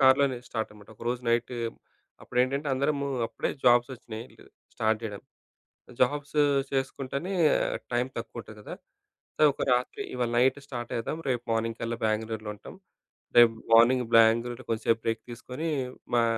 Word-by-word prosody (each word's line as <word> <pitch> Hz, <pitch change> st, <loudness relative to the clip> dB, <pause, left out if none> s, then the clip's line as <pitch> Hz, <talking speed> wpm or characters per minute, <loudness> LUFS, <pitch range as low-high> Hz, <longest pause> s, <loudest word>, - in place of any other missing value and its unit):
కారులోనే 135 Hz, -1 st, +5 dB
స్టార్టనమాట. 105 Hz, -2 st, -5 dB
ఒకరోజు 120 Hz, +1 st, -2 dB
నైటు, 120 Hz, +1 st, +1 dB, 0.7 s
అప్పుడేంటంటే 135 Hz, +4 st, 0 dB
అందరమూ, 140 Hz, +1 st, 0 dB, 0.2 s
అప్పుడే 115 Hz, 0 st, -3 dB
జాబ్సోచ్చినయి, 120 Hz, -2 st, +2 dB
ఇగ -, -, -19 dB, 0.3 s
స్టార్ట్ 110 Hz, -1 st, +1 dB
జేయడం. 105 Hz, -3 st, -5 dB, 0.8 s
జాబ్స్ 145 Hz, +3 st, +1 dB, 0.4 s
చేసుకుంటానే, 135 Hz, +6 st, -2 dB, 0.6 s
టైం 120 Hz, +1 st, +2 dB
తక్కువ 115 Hz, 0 st, -5 dB
ఉంటది 110 Hz, -1 st, -12 dB
గదా! -, -, -7 dB, 0.6 s
సో, -, -, 0 dB
ఒక -, -, -5 dB
రాత్రి 125 Hz, +1 st, 0 dB
ఇవాళ 120 Hz, -2 st, -1 dB
నైట్ 130 Hz, +3 st, +3 dB
స్టార్టయద్దాం. 120 Hz, +2 st, -4 dB
రేపు 120 Hz, -2 st, 0 dB
మార్నింగ్‌కల్లా 115 Hz, +1 st, -2 dB
బెంగుళూరులో 110 Hz, 0 st, -1 dB
ఉంటాం. 105 Hz, -, -12 dB, 0.6 s
రేపు 115 Hz, -1 st, +8 dB, 0.2 s
మార్నింగ్ 125 Hz, +2 st, +6 dB
బెంగుళూరులో 115 Hz, +2 st, +4 dB
కొంసేపు 115 Hz, +1 st, +1 dB
బ్రేక్ 115 Hz, 0 st, -1 dB
తీసుకొని, 130 Hz, +7 st, -5 dB, 0.5 s
మా 120 Hz, -, +5 dB
120 Hz, 125 wpm, -28 LUFS, 115-130 Hz, 0.8 s, రేపు